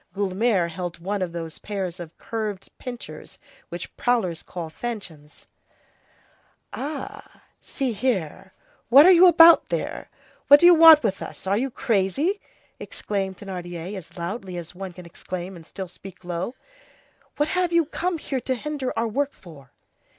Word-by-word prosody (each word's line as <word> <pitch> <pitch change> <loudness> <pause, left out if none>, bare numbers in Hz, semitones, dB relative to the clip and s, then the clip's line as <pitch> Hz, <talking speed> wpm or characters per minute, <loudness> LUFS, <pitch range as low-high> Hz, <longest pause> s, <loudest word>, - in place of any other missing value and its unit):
Guelemer 195 -1 +1
held 175 0 -6
one 195 +4 -3
of 180 -2 -2
those 165 -2 -7
pairs 190 -4 -5
of 170 -2 -10
curved 215 -4 -5
pincers 245 -2 -9 0.3
which - - -8
prowlers 210 -10 0
call 175 -2 -7
fanchons. 165 -8 -8 1.3
"Ah, 290 +2 -7 0.2
see 260 -4 -3
here, 195 - -2 0.4
what 275 +5 +9
are 370 - +8
you 365 0 +8
about 335 -1 +7
there? - - -4 0.4
What 285 +1 +9
do 345 - +4
you 350 - +9
want 320 -3 +9
with 195 -4 -1
us? - - -9
Are 195 +1 +1
you 260 +6 -1
crazy?" 245 - 0 0.4
exclaimed 195 -2 -4
Thénardier, 180 -1 -7
as 180 -1 -11
loudly 185 +1 -5
as 170 -1 -7
one 190 +1 -7
can 180 0 -12
exclaim 180 +2 -7
and 165 -2 -13
still 190 -2 -7
speak 185 +1 -13
low; 175 +7 -4 0.8
"what 295 +1 +1
have 360 0 0
you 335 -1 +3
come 345 +3 -2
here 270 -4 -4
to 260 - -1
hinder 280 0 -4
our 230 +1 +1
work 280 +5 -1
for?" 145 -7 -15
200 Hz, 155 wpm, -24 LUFS, 175-270 Hz, 1.3 s, what